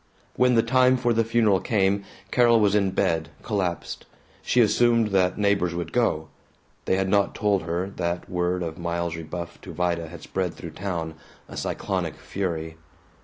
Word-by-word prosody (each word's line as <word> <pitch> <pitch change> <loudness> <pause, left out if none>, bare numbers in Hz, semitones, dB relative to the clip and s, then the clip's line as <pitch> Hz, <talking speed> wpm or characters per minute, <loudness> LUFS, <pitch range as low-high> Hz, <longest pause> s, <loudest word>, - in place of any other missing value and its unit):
When 125 -1 +4
the 115 - +4
time 130 +2 +4
for 120 -1 +1
the 115 0 +2
funeral 110 -4 +3
came, 100 -2 +1 0.3
Carol 120 -2 +5
was 105 -2 +3
in 100 -2 +3
bed, 80 -4 0
collapsed. 95 -5 -3 0.3
She 125 - +1
assumed 115 0 +4
that 95 -2 +2
neighbors 100 -4 +1
would 85 0 -4
go. 80 -11 +1 0.6
They - - +2
had 95 0 0
not 100 +1 +2
told 100 -2 +1
her 90 +4 -3
that 85 0 -2
word 90 0 -1
of 80 0 -5
Miles's 85 -1 -2
rebuff 85 +2 -7
to - - -9
Vida 85 -2 -1
had 85 +1 -11
spread 90 -3 -2
through 85 - -8
town, 85 -3 -4 0.3
a - - -10
cyclonic - - -2
fury. 80 -4 -4
95 Hz, 170 wpm, -25 LUFS, 85-110 Hz, 0.6 s, Carol